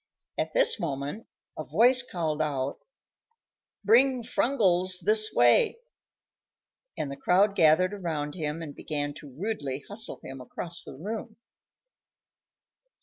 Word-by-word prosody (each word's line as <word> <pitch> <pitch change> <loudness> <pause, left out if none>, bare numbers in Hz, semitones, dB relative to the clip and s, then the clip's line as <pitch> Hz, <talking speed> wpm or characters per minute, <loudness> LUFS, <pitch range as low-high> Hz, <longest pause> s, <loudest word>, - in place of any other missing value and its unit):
At - - -2
this - - +4
moment 145 +6 -4 0.3
a 155 - -5
voice 240 - +4
called 160 -9 -3
out, 140 -3 -2 1.1
"Bring 250 +3 +4
Frungles 185 -7 +2
this 215 0 +2
way;" 120 - +4 1.2
and 140 - -3
the - - -5
crowd 195 +7 +2
gathered 165 +4 +4
around 160 -7 -3
him 160 -1 -4
and 145 -3 -8
began 145 -1 -4
to 145 - -12
rudely 145 - -4
hustle 215 +3 -2
him 135 0 -8
across 170 +6 -6
the - - -10
room. 215 - -6
175 Hz, 120 wpm, -27 LUFS, 145-215 Hz, 1.2 s, this